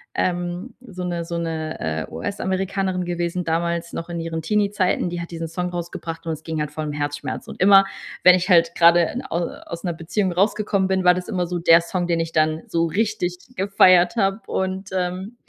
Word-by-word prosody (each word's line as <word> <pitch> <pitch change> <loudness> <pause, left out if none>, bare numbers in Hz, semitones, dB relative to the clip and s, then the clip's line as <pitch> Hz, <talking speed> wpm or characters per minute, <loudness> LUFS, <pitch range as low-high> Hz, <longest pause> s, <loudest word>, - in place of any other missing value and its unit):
ähm, 175 +5 -2
so 190 -7 -8
'ne 175 -1 -2
so 170 0 -4
'ne, 160 -2 -3
äh, 80 0 -3
US-Amerikanerin 190 -1 -2
gewesen 175 0 -2
damals 170 +1 -1
noch 165 - -5
in 170 -1 -4
ihren 165 0 -4
Teenie-Zeiten. 200 0 +1
Die 175 0 -4
hat 170 - -7
diesen 165 -1 -4
Song 180 +2 -3
rausgebracht 170 -1 -6
und - - 0
es 155 - -9
ging 160 -1 -3
halt 150 -1 -3
voll 155 0 -4
um 150 - -3
Herzschmerz. 145 -2 -4
Und - - -9
immer, 195 +1 +8 0.4
wenn 180 - +9
ich 180 0 -1
halt 170 -2 +5
grade 170 +6 +4
au 170 - -1 0.2
aus 170 0 -7
'ner 180 - -1
Beziehung 175 +4 -1
rausgekommen 200 +1 +1
bin, 190 -1 +1
war 180 - +7
das 180 0 -5
immer 185 -5 -1
so 180 +1 -2
der 165 0 +6
Song, 175 +1 -2
den 170 -1 +1
ich 165 0 -4
dann 155 0 +2
so 165 0 +1
richtig 180 0 -1 0.2
gefeiert 185 -2 +5
habe. 195 -1 +1
Und 190 +1 -2
ähm, 185 +4 -3
175 Hz, 200 wpm, -22 LUFS, 165-190 Hz, 0.4 s, wenn